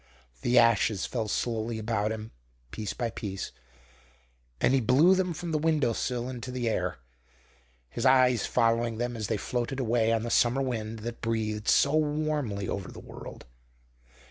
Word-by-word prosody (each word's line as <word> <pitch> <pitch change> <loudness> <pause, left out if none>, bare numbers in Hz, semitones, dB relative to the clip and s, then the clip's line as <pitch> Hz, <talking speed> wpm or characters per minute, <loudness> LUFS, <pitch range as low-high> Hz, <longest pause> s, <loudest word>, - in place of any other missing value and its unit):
The 120 +1 +2
ashes 115 -4 +4
fell 115 -3 -2
slowly 115 +1 -2
about 110 -1 -1
him, 110 0 -6 0.4
piece 105 -2 -4
by 120 -2 -3
piece, 100 -3 -5 1.1
and - - +3
he 135 - +4
blew 140 - +5
them 185 -1 +1
from 170 +1 -5
the 155 - +1
window 150 -6 +2
sill 120 +1 -2
into 130 -1 -6
the 125 -2 -2
air, 110 - -1 0.9
his 65 - -5
eyes 130 -3 +4
following 115 0 +1
them 120 +1 -2
as 110 -3 -3
they 110 - 0
floated 125 +5 -3
away 115 -2 +2
on 115 -1 +1
the 120 - -3
summer 125 +3 +3
wind 115 -3 -3
that 120 0 -5
breathed 110 -2 -2
so 140 +2 +4
warmly 150 -9 0
over 100 -2 -4
the - - -10
world. - - -10
120 Hz, 165 wpm, -28 LUFS, 110-130 Hz, 1.1 s, blew